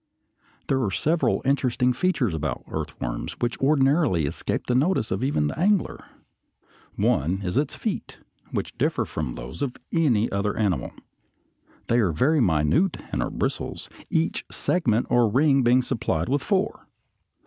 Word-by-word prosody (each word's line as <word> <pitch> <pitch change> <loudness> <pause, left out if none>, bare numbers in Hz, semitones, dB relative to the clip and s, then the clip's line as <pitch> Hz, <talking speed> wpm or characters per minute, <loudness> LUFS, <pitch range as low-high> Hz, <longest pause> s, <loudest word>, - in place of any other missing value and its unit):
There 135 -1 +1
are 105 - 0
several 160 - +1
interesting 125 -2 +2
features 125 - 0
about 75 -1 -3
earthworms - - -4
which 120 0 -3
ordinarily 135 - +3
escape 70 - -3
the 125 - 0
notice 135 - +1
of 95 +5 -1
even 130 - +1
the 75 - -3
angler. 200 +1 +1 0.9
One 90 +7 +1
is 90 -1 -2
its 140 +2 0
feet, - - -4 0.3
which - - -4
differ - - +1
from 75 -6 -4
those - - -8
of 135 -3 -2 0.2
any 125 -10 +3
other 100 +1 -1
animal. 95 - 0 0.9
They 120 - +2
are 100 -7 +2
very 140 - +2
minute, 90 - +2
and - - -1
are - - -1
bristles, - - -3 0.2
each 160 0 0
segment 120 -10 +1
or 120 -2 +4
ring 135 +4 +3
being 125 +1 +4
supplied 105 -10 -1
with 140 +1 +1
four. 200 +1 -1
125 Hz, 150 wpm, -25 LUFS, 95-145 Hz, 0.9 s, or